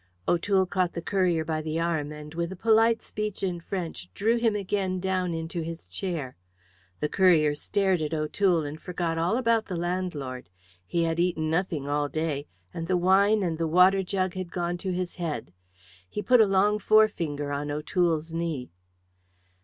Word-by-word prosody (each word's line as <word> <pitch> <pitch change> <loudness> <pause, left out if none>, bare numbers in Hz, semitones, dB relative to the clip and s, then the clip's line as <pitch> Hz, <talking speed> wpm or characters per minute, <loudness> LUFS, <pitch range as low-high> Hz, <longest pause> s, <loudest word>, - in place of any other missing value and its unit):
O'Toole 190 +2 +2
caught 185 -2 0
the 170 - -4
courier 180 -5 +1
by 155 0 -1
the 155 +1 -2
arm 160 -3 -1
and 150 0 -9
with 170 +1 -2
a - - -5
polite 225 +3 +3
speech 210 -2 -4
in 180 -3 -1
French 170 - -5
drew 225 +3 +2
him 230 -2 +2
again 190 -2 -1
down 185 -1 -1
into 165 +1 -4
his 165 - -6
chair. 140 - -4 0.7
The 150 - +1
courier 160 -4 +4
stared 190 +3 0
at 155 -1 -2
O'Toole 165 +2 +1
and 150 +2 -7
forgot 170 -2 -2
all 175 +8 +1
about 230 -3 +2
the 185 - -4
landlord. 170 - -3 0.4
He 170 -1 0
had 165 0 0
eaten 165 -3 0
nothing 165 -4 -1
all 145 0 0
day, 155 -2 -2 0.3
and 165 -1 -4
the 185 - +2
wine 200 +4 +4
and 165 -3 -2
the 165 - +1
water 180 +4 +5
jug 185 -1 -1
had 185 -2 -5
gone 175 0 -2
to 190 +1 -3
his 180 0 -3
head. 150 - -4 0.6
He 210 - -4
put 250 +3 +6
a 215 - +5
long 200 +2 +3
forefinger 170 -10 +2
on 145 +1 -3
O'Toole's 160 +1 0
knee. 165 - -3
175 Hz, 175 wpm, -27 LUFS, 155-190 Hz, 0.7 s, put